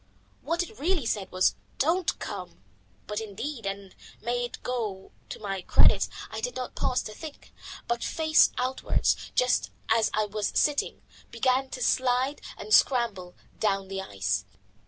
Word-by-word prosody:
What 335 +5 0
it 430 +5 -12
really 335 -3 +1
said 200 -4 -1
was 185 0 +3 0.2
"Don't 330 +5 +2
come." - - -7 0.4
But 210 +1 -3
indeed 225 +3 -5
and 195 -1 -5 0.3
may 245 +1 -1
it 240 - -4
go 215 -6 -3 0.2
to - - -5
my 195 -2 -3
credit - - +5 0.2
I - - -4
did - - -2
not 255 -1 -4
pause 255 -1 0
to 215 - -7
think, 305 +6 -10 0.3
but 235 0 -1
face 315 -1 +4
outwards, 255 +1 0
just 250 0 +3 0.2
as 225 -1 +4
I 215 0 +2
was 210 0 -2
sitting, 295 -1 +1 0.3
began 255 +3 +1
to 250 - -4
slide 255 +3 +2 0.2
and 215 +1 -3
scramble 210 -10 +3 0.2
down 195 -2 +1
the 195 0 -3
ice. 100 - -1
235 Hz, 155 wpm, -28 LUFS, 200-265 Hz, 0.4 s, credit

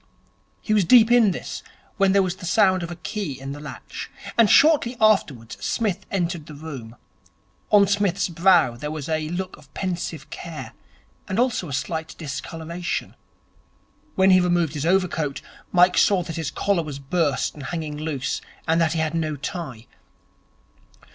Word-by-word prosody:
He 215 - -1
was 210 -2 +4
deep 230 +5 +6
in 240 -4 +6
this, 185 - -5 0.4
when 195 -1 +4
there 195 0 +4
was 185 0 -3
the 180 - -8
sound 185 -2 +3
of 170 - -5
a 175 - -6
key 170 -5 -5
in 135 +1 -6
the 145 - -7
latch, 145 -4 -8 0.3
and 230 -3 +5
shortly 285 -5 +5
afterwards 150 - +1
Psmith 215 -6 -1
entered 175 -4 -2
the 150 - -9
room. 135 -7 -8 0.7
On 205 -1 +6
Psmith's 200 -2 +1
brow 170 -7 +4
there 150 +5 -5
was 150 -2 -5
a 155 -1 -1
look 185 +2 -4
of 140 -2 -19
pensive 175 -5 -4
care, 165 -2 -7 0.5
and 190 - -3
also 240 - 0
a - - -5
slight 160 +4 -3
discoloration. 165 +3 -5 1.0
When 190 0 +5
he 185 0 +6
removed 175 -4 +1
his 150 +1 -2
overcoat, 170 -6 0 0.3
Mike 180 0 +5
saw 190 -3 +4
that 165 -2 -6
his 160 -3 -2
collar 195 +4 0
was 150 -4 -6
burst 140 -1 0
and 150 - -11
hanging 150 +2 -4
loose 150 -4 -3 0.3
and 165 +1 +3
that 165 -1 +2
he 165 - -1
had 160 0 0
no 155 -2 -1
tie. 140 - -6
170 Hz, 165 wpm, -23 LUFS, 150-190 Hz, 1.0 s, deep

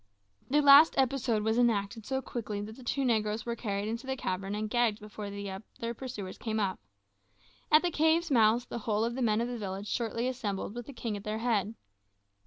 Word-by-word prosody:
This 295 +2 +3
last 285 +3 +8
episode 250 -5 +1
was 220 +2 +1
enacted 220 -2 +1
so 265 0 -1
quickly 215 -4 -4
that 215 +2 -7
the 260 - -13
two 270 +2 -1
negroes 215 -2 0
were 235 0 -2
carried 205 -3 -3
into 230 +4 -4
the 265 - -1
cavern 195 -1 -3
and 215 +1 -2
gagged 230 -1 +1
before 210 -1 -7
the 200 -1 -5
other 220 +4 -6
pursuers 220 -7 -7
came 220 -1 -2
up. 195 -3 -1 0.9
At 305 +2 +7
the 350 - +1
cave's 320 +1 +2
mouth 230 -1 +4
the - - -5
whole 215 0 0
of 235 - -2
the 260 - -4
men 220 -2 +2
of 235 - -1
the 245 -1 -5
village 195 0 -5
shortly 235 +1 -1
assembled 210 -6 -3
with 240 0 -7
the - - -7
king 230 -3 -4
at 200 - -7
their 215 0 -3
head. 225 -2 0
225 Hz, 210 wpm, -30 LUFS, 210-245 Hz, 0.9 s, last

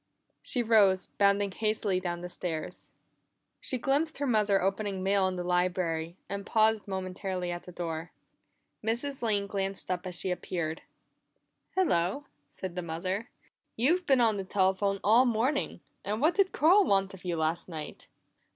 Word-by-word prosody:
She 245 - -1
rose, 205 -5 +4
bounding 200 0 +3
hastily 215 -2 0
down 175 -1 -3
the 180 - -5
stairs. 170 -3 -5 0.7
She 260 - -1
glimpsed 290 +5 0
her 285 - -1
mother 210 -5 +3
opening 195 0 -1
mail 195 0 +3
in 185 - -2
the 180 - -3
library, 180 -2 0
and 200 0 -4
paused 220 0 +2
momentarily 185 -1 -3
at 175 0 -6
the - - -7
door. 165 -1 -5 0.7
Mrs. 240 +5 -2
Lane 210 -4 +1
glanced 195 -1 -3
up 180 +1 -2
as 180 - -3
she 185 +1 -2
appeared. 170 -3 -3 0.9
"Hello," 275 - +1 0.2
said 185 +3 -6
the 180 - -3
mother. 185 +7 -3 0.5
"You've 340 +10 +2
been 265 -3 +5
on 220 -3 +3
the 195 - -2
telephone 195 +1 +1
all 225 +5 +6
morning, 245 - 0 0.2
and 210 +2 -2
what 315 +6 +3
did 390 -1 +2
Carl 360 +7 +5
want 195 - +2
of 190 - -12
you 175 -2 -2
last 160 +3 -1
night?" 155 -3 -7
195 Hz, 160 wpm, -29 LUFS, 180-225 Hz, 0.9 s, all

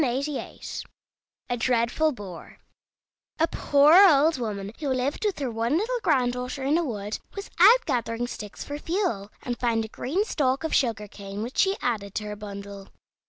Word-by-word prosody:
A 270 -1 -5
DREADFUL 245 +6 +2
BOAR 195 -7 -10 0.8
A 325 - +4
poor 290 0 +4 0.2
old 300 0 +4
woman 205 -4 -4
who 295 - -3
lived 260 - -1
with 410 -3 0
her 270 -4 -2
one 230 +3 -1
little 485 +6 -1
granddaughter 250 - 0
in 280 +3 +2
a - - 0
wood 210 -7 -4 0.2
was 400 0 -7
out 445 +8 +7
gathering 240 -3 -1
sticks 210 -4 -7
for 290 0 -6
fuel, 310 - -1
and 245 -1 -4
found 230 -2 +1
a - - -10
green 345 - -1
stalk 275 - 0
of 320 - -2
sugar 225 -5 +1
cane, 200 +1 -7
which 245 +3 -5
she 390 0 +3
added 205 -5 -2
to 215 - -2
her 210 0 -5
bundle. 200 -1 -8
250 Hz, 165 wpm, -26 LUFS, 215-295 Hz, 0.8 s, out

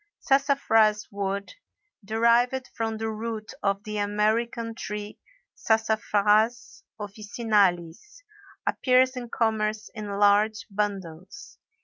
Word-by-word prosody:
Sassafras 245 -6 +2
wood, 200 0 -3 0.5
derived 235 +4 +2
from 225 -1 -3
the 220 0 -3
root 220 0 -5
of 200 0 0
the 210 -1 -4
American 225 +3 0
tree 210 -2 -6 0.3
Sassafras 220 +2 +1 0.2
officinalis, 205 - -1 0.4
appears 255 0 +3
in 245 -2 -6
commerce 220 -1 -1
in 215 -3 -6
large 205 +1 +3
bundles. 195 - -5
215 Hz, 90 wpm, -26 LUFS, 205-230 Hz, 0.5 s, appears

